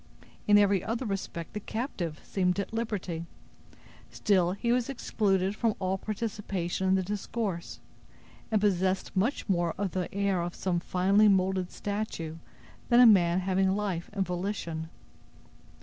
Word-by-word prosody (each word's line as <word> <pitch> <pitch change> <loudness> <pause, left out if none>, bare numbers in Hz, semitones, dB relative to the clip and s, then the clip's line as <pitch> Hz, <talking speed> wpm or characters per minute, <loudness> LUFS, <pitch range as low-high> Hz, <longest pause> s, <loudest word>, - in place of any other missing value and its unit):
In 205 0 +7
every 200 -2 +4
other 230 +4 -2
respect, 195 -5 -4
the 210 - -3
captive 200 - -4
seemed 180 0 0
at 200 - -4
liberty; 190 -7 -3 0.8
still 185 -4 +2
he 235 +4 -1
was 245 0 +1
excluded 200 -6 0
from 225 -1 +1
all 190 0 -1
participation 200 -4 -3
in 190 - +4
the 190 - +1
discourse, 200 -2 -4 0.7
and 215 - +3
possessed 190 -2 0
much 220 +9 0
more 175 -4 +1
of 195 -2 -1
the 185 -2 -3
air 200 -2 0
of 170 0 -4
some 180 -2 0
finely 195 +4 +3
molded 190 -2 +2
statue 200 -6 -4 0.5
than 240 -1 +6
a 250 - +9
man 185 -5 +5
having 190 +1 +2
life 195 -5 -2
and 195 -2 -1
volition. 175 -3 -3
195 Hz, 145 wpm, -29 LUFS, 180-210 Hz, 0.8 s, a